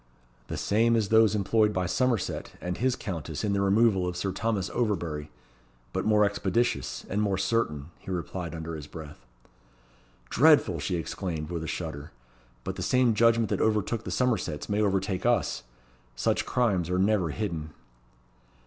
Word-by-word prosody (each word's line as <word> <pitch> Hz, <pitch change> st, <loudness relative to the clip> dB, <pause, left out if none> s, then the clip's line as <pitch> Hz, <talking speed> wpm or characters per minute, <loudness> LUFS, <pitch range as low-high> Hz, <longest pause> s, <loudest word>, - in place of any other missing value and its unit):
"The -, -, -4 dB
same 115 Hz, +3 st, +2 dB
as 110 Hz, -4 st, +1 dB
those 110 Hz, -1 st, +5 dB
employed 105 Hz, +1 st, +2 dB
by 90 Hz, -2 st, 0 dB
Somerset 115 Hz, +3 st, -1 dB
and 90 Hz, 0 st, -3 dB
his 125 Hz, +4 st, +1 dB
Countess 80 Hz, -6 st, -5 dB
in 105 Hz, -2 st, +1 dB
the 100 Hz, -, +1 dB
removal 100 Hz, -1 st, +3 dB
of 90 Hz, 0 st, -3 dB
Sir 95 Hz, +1 st, -1 dB
Thomas 100 Hz, -1 st, -1 dB
Overbury; 85 Hz, -10 st, -2 dB, 0.6 s
but -, -, -1 dB
more 105 Hz, -1 st, +5 dB
expeditious 100 Hz, +3 st, -1 dB
and 105 Hz, +2 st, -1 dB
more 100 Hz, -2 st, +1 dB
certain," 85 Hz, -8 st, -1 dB
he -, -, -11 dB
replied 90 Hz, -1 st, -4 dB
under 80 Hz, 0 st, -5 dB
his 75 Hz, -3 st, -7 dB
breath. 75 Hz, -6 st, -11 dB, 1.0 s
"Dreadful!" 140 Hz, -, +5 dB
she 75 Hz, +5 st, -2 dB
exclaimed, 85 Hz, -1 st, -4 dB
with 85 Hz, -2 st, -3 dB
a -, -, -5 dB
shudder. 75 Hz, -4 st, -5 dB, 0.5 s
"But -, -, -4 dB
the -, -, -4 dB
same 125 Hz, -2 st, +3 dB
judgment 115 Hz, 0 st, +3 dB
that -, -, 0 dB
overtook 110 Hz, +1 st, +1 dB
the -, -, -6 dB
Somersets 90 Hz, -, -1 dB
may 105 Hz, +1 st, 0 dB
overtake 95 Hz, -2 st, 0 dB
us. 120 Hz, -1 st, +1 dB, 0.5 s
Such 65 Hz, -, 0 dB
crimes 100 Hz, -9 st, +1 dB
are 90 Hz, -, +1 dB
never 95 Hz, -2 st, +2 dB
hidden." 80 Hz, -4 st, -3 dB
95 Hz, 160 wpm, -28 LUFS, 85-110 Hz, 1.0 s, those